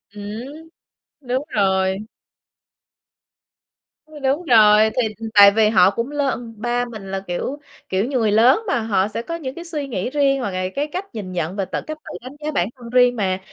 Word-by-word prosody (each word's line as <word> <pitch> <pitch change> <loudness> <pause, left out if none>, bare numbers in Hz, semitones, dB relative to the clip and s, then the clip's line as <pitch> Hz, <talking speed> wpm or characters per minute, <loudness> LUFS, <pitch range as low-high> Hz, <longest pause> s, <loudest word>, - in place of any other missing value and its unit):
Ừm. 245 +10 -8 0.5
Đúng 260 +1 -2
rồi. 190 -2 +2 2.3
Đúng 280 +6 0
rồi. 215 -4 +6
Thì, 230 - +1
ừ, 225 0 -6
tại 200 -1 +9
vì 215 +1 +3
họ 190 -4 +5
cũng 230 +6 -3
lớn 270 -5 -2
ba 240 +2 -1
mình 215 -5 -9
là, 195 - -2
kiểu 220 +11 -3 0.3
kiểu 190 +3 0
như, 265 +1 -1
người 220 -2 +2
lớn 230 - +5
mà, 325 - +1
họ 200 -3 +1
sẽ 215 +2 -4
có 335 +8 -5
những 275 -5 -6
cái 340 - -8
suy 300 -4 -4
nghĩ 225 -3 -3
riêng, 275 -1 +2
hoặc 240 -6 -3
là 185 0 -2
cái 290 +2 -1
cách 365 +6 -5
nhìn 200 -4 -6
nhận 175 0 -3
và 195 -2 -1
tự - - -4
cách 310 0 -5
tự - - -8
đánh 255 +3 -10
giá 305 - -1
bản 190 -11 0
thân 240 -2 -11
riêng 250 0 +4
mà. 190 -4 -1
230 Hz, 200 wpm, -21 LUFS, 200-275 Hz, 2.3 s, tại